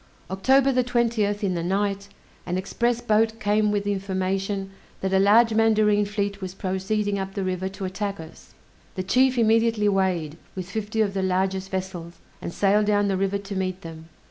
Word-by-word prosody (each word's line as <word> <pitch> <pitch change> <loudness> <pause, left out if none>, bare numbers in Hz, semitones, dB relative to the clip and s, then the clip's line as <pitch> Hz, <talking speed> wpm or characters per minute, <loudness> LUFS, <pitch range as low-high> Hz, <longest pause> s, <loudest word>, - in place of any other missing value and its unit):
October 265 +8 +3
the 255 -1 +2
20th, 230 -4 0
in 190 -2 +1
the 170 - -2
night, 200 +2 -1 0.4
an 180 +1 -1
express 235 +5 -1
boat 225 -1 +1
came 210 0 +2
with 205 -1 0
the 205 - -1
information 195 0 -2 0.3
that 190 0 -2
a 190 - +4
large 220 +4 +5
mandarine 215 -2 +3
fleet 200 -1 -3
was 185 0 -6
proceeding 200 +2 -1
up 195 0 -5
the 200 - -2
river 185 0 -2
to 195 0 -6
attack 200 +1 -4
us. 160 0 -13 0.4
The 185 - -2
chief 255 +6 +3
immediately 225 -1 +3
weighed, 185 -6 0 0.2
with 185 -2 -5
fifty 220 +1 -2
of 200 -2 +1
the 195 - -1
largest 190 +1 -1
vessels, 185 -3 -5 0.3
and - - -5
sailed 205 +3 +2
down 205 -1 +2
the 195 - +1
river 195 +1 0
to 200 0 -7
meet 185 0 -2
them. 165 -1 -10
200 Hz, 185 wpm, -24 LUFS, 190-215 Hz, 0.4 s, large